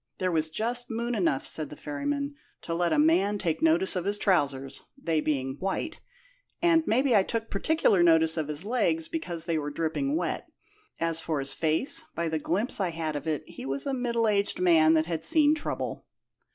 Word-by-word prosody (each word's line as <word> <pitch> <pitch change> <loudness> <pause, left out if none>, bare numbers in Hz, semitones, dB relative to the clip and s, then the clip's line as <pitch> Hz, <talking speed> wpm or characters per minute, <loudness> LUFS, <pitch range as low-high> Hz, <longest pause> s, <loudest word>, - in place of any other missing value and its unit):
'There 185 -1 -1
was 160 -1 0
just 240 +8 -2
moon 235 +1 -2
enough,' 170 - 0
said 155 -3 -2
the - - -9
ferry 145 - -5
man, 285 0 -2 0.3
'to 165 - -4
let 170 0 0
a 155 - +2
man 180 +7 +3
take 165 -5 -2
notice 165 +5 +3
of 180 - -1
his 200 +2 0
trousers, 140 -9 0 0.2
they 165 - -1
being 135 -3 -2
white; 195 - -3 0.6
and 335 -1 +4
maybe 255 +2 +3
I 200 - +6
took 225 +3 -3
particular 205 - +2
notice 160 -1 +4
of 155 -3 -2
his 150 +4 -4
legs, 170 -9 0
because 175 - -2
they 165 -2 0
were 145 -1 -4
dripping 165 - -1
wet. - - -3 0.5
As 165 -1 +1
for 160 -2 -2
his 135 0 -2
face, 165 - +3
by 170 -1 -1
the 160 0 -1
glimpse 195 +11 0
I 190 -3 0
had 160 -2 -4
of 145 +2 -5
it 155 -3 -2
he - - -10
was 135 +1 0
a 275 - -1
middle 235 -3 0
aged 205 -2 +1
man 165 -3 +5
that 160 0 +2
had 165 -1 -4
seen 310 -2 +4
trouble.' 310 -1 -4
170 Hz, 205 wpm, -27 LUFS, 160-230 Hz, 0.6 s, I